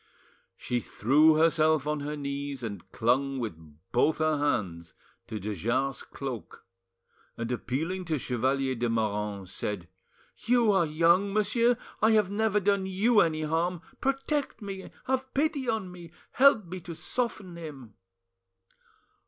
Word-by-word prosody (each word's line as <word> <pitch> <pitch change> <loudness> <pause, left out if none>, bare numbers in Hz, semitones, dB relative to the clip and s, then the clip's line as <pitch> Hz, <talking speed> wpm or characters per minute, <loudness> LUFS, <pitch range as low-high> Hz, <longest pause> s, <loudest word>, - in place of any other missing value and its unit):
She 125 - -1
threw 145 +9 +4
herself 155 -2 +3
on 150 0 -1
her 150 +1 -4
knees 140 -2 -4
and 100 -4 -6
clung 135 +4 +1
with 115 -6 -3 0.4
both 150 +6 +3
her 155 -2 +1
hands 90 - -1 0.3
to 110 -2 -5
de 105 +2 -3
Jars' 125 +8 -1
cloak, 130 -6 -7 0.7
and 115 +1 -3
appealing 160 +10 -2
to 160 -2 0
Chevalier 130 +2 0
de 120 -1 -1
Moranges, 105 -4 -2
said— 100 -3 -4 0.5
"You 235 -2 +3
are 190 -4 +3
young, 170 +6 +3
monsieur; 230 +3 +2 0.2
I 220 +1 +5
have 210 -3 +3
never 210 0 +2
done 200 -1 +1
you 205 +4 +3
any 160 -4 +2
harm; 165 +2 -1 0.2
protect 275 0 -1
me, 195 -3 -7 0.2
have 265 0 -1
pity 280 -3 0
on 215 -5 -2
me, 175 -2 -11 0.2
help 260 -6 +5
me 180 +2 -6
to 170 -1 -8
soften 215 -5 -3
him!" 140 -9 -9
155 Hz, 140 wpm, -28 LUFS, 125-200 Hz, 0.7 s, I